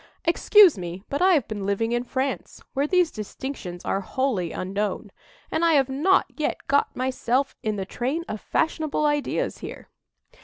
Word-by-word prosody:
Excuse 350 - +6
me, 175 +2 -6
but 285 - -2
I 375 +1 +6
have 280 -7 +1
been 210 -2 -5
living 200 +4 0
in 240 0 0
France, 260 +2 -3
where 280 +2 +1
these 360 -1 +3
distinctions 210 -4 -6
are 195 - 0
wholly 205 -7 -1
unknown, 200 +2 -3 0.4
and 330 - 0
I 335 -1 +5
have 275 -3 +3
not 315 +9 +3
yet 305 - -1
got 280 +1 +2
myself 260 +1 0
in 215 -3 -1
the 195 -2 -3
train 270 - -2
of 215 - -5
fashionable 310 -1 0
ideas 295 - 0
here." - - -9
265 Hz, 165 wpm, -25 LUFS, 210-300 Hz, 0.4 s, Excuse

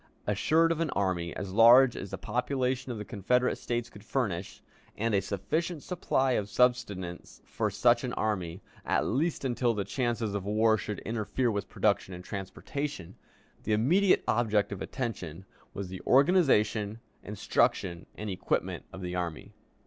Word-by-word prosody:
Assured 160 +11 +3
of 165 - -1
an 165 -2 0
army 90 -3 0
as 95 0 -5
large 120 +3 +7
as 100 - -6
the - - -5
population 125 +2 -1
of 115 - -4
the 105 - -6
Confederate 125 +3 +1
States 120 -1 -2
could 105 - -14
furnish, 100 -7 -3 0.3
and 115 +1 0
a 100 - +3
sufficient 140 - -2
supply 135 -7 0
of 105 -4 0
subsistence 100 -7 0
for - - -1
such - - +3
an - - -2
army, 95 -4 -2 0.2
at - - +1
least 145 +4 0
until 120 -2 +1
the 100 -2 -2
chances 120 -1 -1
of 100 -2 -2
war 110 +2 +3
should 105 -1 -4
interfere 115 +2 -1
with 100 -3 -3
production 95 - 0
and 90 - -9
transportation, 100 - -5 0.5
the 110 - -1
immediate 175 - +3
object 110 -3 +2
of 100 - -5
attention 95 - -5 0.3
was 95 -2 -5
the 95 0 -7
organization, 125 - +3 0.2
instruction, 95 -3 0
and 105 -1 -5
equipment 95 - -2
of 95 - -9
the 90 -1 -4
army. 85 -3 -4
110 Hz, 155 wpm, -29 LUFS, 95-125 Hz, 0.5 s, large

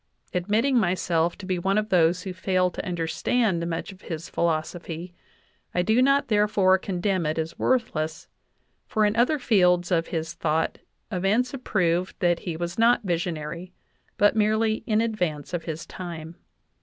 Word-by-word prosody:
Admitting 215 +9 +2
myself 175 -3 +1
to 200 - -9
be 185 -1 -1
one 195 +3 +1
of 215 0 0
those 175 -1 +3
who 190 - -5
fail 185 0 +1
to - - -5
under 175 -2 -2
stand 185 -1 0
much 165 +3 -4
of 190 - -15
his 165 -1 -6
philosophy, 170 +1 -2 0.6
I 180 - +2
do 220 +5 +3
not 275 +2 +3
therefore 205 -3 +3
condemn 185 0 -1
it 155 - -1
as 160 0 -4
worthless, 160 -11 0 0.6
for 215 -1 +2
in 210 +1 +1
other 250 +6 +3
fields 180 -8 +3
of 165 -2 +2
his 160 -1 -3
thought 160 +1 -1 0.3
events 210 +7 +1
have 270 -2 -7
proved 180 -1 0
that 175 -1 +2
Vie 170 -3 -3
was 175 +4 -4
not 235 +1 +4
visionary, 170 -1 -3 0.4
but 205 +2 +4
merely 220 +1 +1
in 215 0 +2
advance 180 -10 -2
of 170 -2 -3
his 160 -1 -5
time." 170 -2 -7
180 Hz, 165 wpm, -25 LUFS, 170-215 Hz, 0.6 s, not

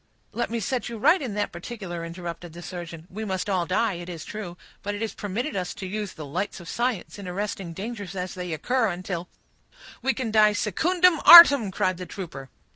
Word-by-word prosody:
"Let 240 - -2
me 230 +1 -2
set 240 +4 -2
you 235 - -6
right 315 - +4
in 240 -7 -4
that 210 - -1
particular," 175 -2 -7
interrupted 170 0 -7
the 175 +1 -10
surgeon. 170 -3 -8
"We 215 +4 -5
must 190 -2 -3
all 185 -4 0
die, 205 +3 +1
it 175 0 -7
is 165 -3 -7
true, 190 -5 -7 0.2
but 205 +1 -3
it 205 - -6
is 225 - -3
permitted 225 +8 -4
us 180 -2 -3
to 190 - -7
use 205 +1 -4
the 155 - -8
lights 185 +8 -4
of 175 - -12
science, 235 -2 -2
in 195 - -8
arresting 190 -1 -4
dangers 205 0 -6
as 180 -1 -4
they 180 -2 -5
occur, 245 - 0
until—" 180 -1 -4 0.7
"We 265 +2 +1
can 245 -5 -3
die 215 -1 +5
secundem 335 - +2
artem," 285 - +10
cried 185 -2 0
the 180 0 -7
trooper. 150 -9 -8
195 Hz, 205 wpm, -25 LUFS, 175-225 Hz, 0.7 s, artem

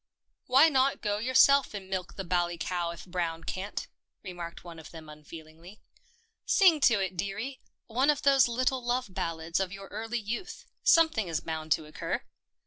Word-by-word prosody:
" - - -50
Why 270 +5 +6
not 275 -2 +1
go 205 -1 0
yourself 260 +1 +4
and 195 -2 -7
milk 185 -1 -4
the 195 - -5
bally 175 -1 0
cow 175 0 -2
if 170 - -8
Brown 170 -3 -3
can't? 195 +4 -4 0.2
" - - -56
remarked 175 -3 -8
one 170 -2 -10
of 160 - -11
them 160 -2 -11
unfeelingly. 160 +5 -13 0.4
" 455 -1 -42
Sing 360 -6 +6
to 235 -6 +4
it, 190 -1 -2
dearie 205 +9 -4 0.2
— - - -60
one 255 +5 +1
of 295 -1 +2
those 275 -3 +5
little 255 +2 0
love 245 -4 -2
ballads 165 0 -2
of 190 -1 -2
your 195 0 -9
early 225 +3 -4
youth. 235 - -5 0.2
Something 320 - +4
is 165 -2 -1
bound 160 -1 -5
to 155 - -4
occur." 155 - -4
195 Hz, 190 wpm, -29 LUFS, 170-255 Hz, 0.4 s, Why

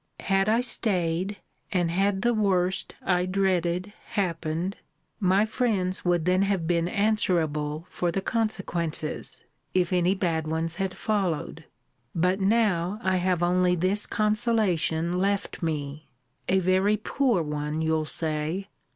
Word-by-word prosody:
Had 195 +1 +2
I 225 +2 +3
staid, 190 -5 0 0.3
and 175 -3 +1
had 195 +2 +1
the 240 0 +3
worst 190 -3 0
I 180 -1 +1
dreaded 185 0 0 0.2
happened, 170 0 -1 0.4
my 195 +1 +3
friends 210 -5 0
would 175 -2 +1
then 185 +1 +3
have 195 -4 +1
been 170 0 +1
answerable 170 -7 0
for 175 -1 -1
the 195 - -1
consequences, 190 -8 -2 0.3
if 180 0 +2
any 180 +2 +3
bad 165 -4 -1
ones 160 +1 -2
had 190 -1 -2
followed: 195 -8 -2 0.5
but 180 +3 +2
now, 200 -2 +2
I 185 0 +2
have 180 -1 +1
only 180 0 +3
this 185 +4 0
consolation 195 -6 +1
left 200 +1 -1
me 150 -2 -3 0.4
(a 190 - +4
very 190 +3 +3
poor 230 -3 +1
one, 150 +1 -2
you'll 160 -1 +1
say!) 160 +5 -2
185 Hz, 130 wpm, -26 LUFS, 165-200 Hz, 0.5 s, a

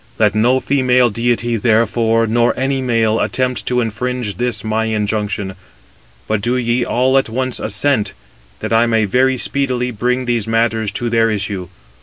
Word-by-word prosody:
Let 105 -2 +3
no 120 +5 +3
female 125 -3 +2
deity, 120 +1 0
therefore, 115 +1 +2
nor 120 +2 +1
any 135 +1 0
male, 115 -3 +1
attempt 125 -1 -1
to 125 0 +1
infringe 115 -2 -3
this 120 +1 -2
my 110 +1 -1
injunction; 105 -2 -2 0.7
but 110 -1 0
do 120 +4 0
ye 120 0 0
all 130 +3 +2
at 135 - -3
once 130 +2 -2
assent, 110 +1 0 0.5
that 110 +1 -2
I 115 +1 +4
may 110 -2 +2
very 130 +6 +2
speedily 125 -1 -1
bring 125 +3 -1
these 120 -3 -1
matters 115 -1 0
to 120 +2 -3
their 115 -1 +3
issue. 100 -3 -3
115 Hz, 160 wpm, -17 LUFS, 110-125 Hz, 0.7 s, I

